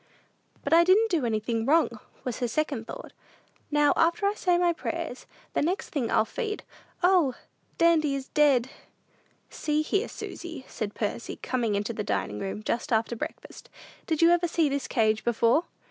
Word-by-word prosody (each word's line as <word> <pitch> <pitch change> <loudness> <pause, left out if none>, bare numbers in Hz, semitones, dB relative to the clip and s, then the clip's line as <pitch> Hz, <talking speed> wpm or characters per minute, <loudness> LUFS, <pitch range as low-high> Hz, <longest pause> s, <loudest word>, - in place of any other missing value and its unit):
"But - - 0
I 335 +1 +8
didn't 405 +5 +4
do 310 -9 +1
anything 225 +1 -1
wrong," 315 +7 +2 0.2
was 250 -4 -4
her 245 - 0
second 265 -2 -2
thought. - - -8 0.6
"Now, 295 -1 +4
after 335 +5 +2
I 400 - +3
say 360 -4 +1
my 350 -1 +3
prayers, 330 -5 -5 0.3
the - - +1
next 355 +6 -1
thing 265 -7 -2
I'll 220 - +3
feed 430 - -4 0.4
O, 350 -8 +4 0.4
Dandy 320 -4 +3
is 270 -1 -5
dead!" 275 -4 +3 0.8
"See 300 0 0
here, 400 +8 0
Susy," 330 -6 -8
said 210 -2 -5
Percy, 215 +2 -3
coming 235 -5 -1
into 205 +3 -2
the 215 - -3
dining 100 - -2
room, 200 +2 -4
just 235 +5 -2
after 225 +1 +1
breakfast; 300 +7 -8 0.4
"did 320 -1 +1
you 335 - +7
ever 345 0 +3
see 330 -3 +2
this 280 0 -2
cage 220 -2 +1
before?" 235 +6 +2
290 Hz, 170 wpm, -27 LUFS, 230-335 Hz, 0.8 s, I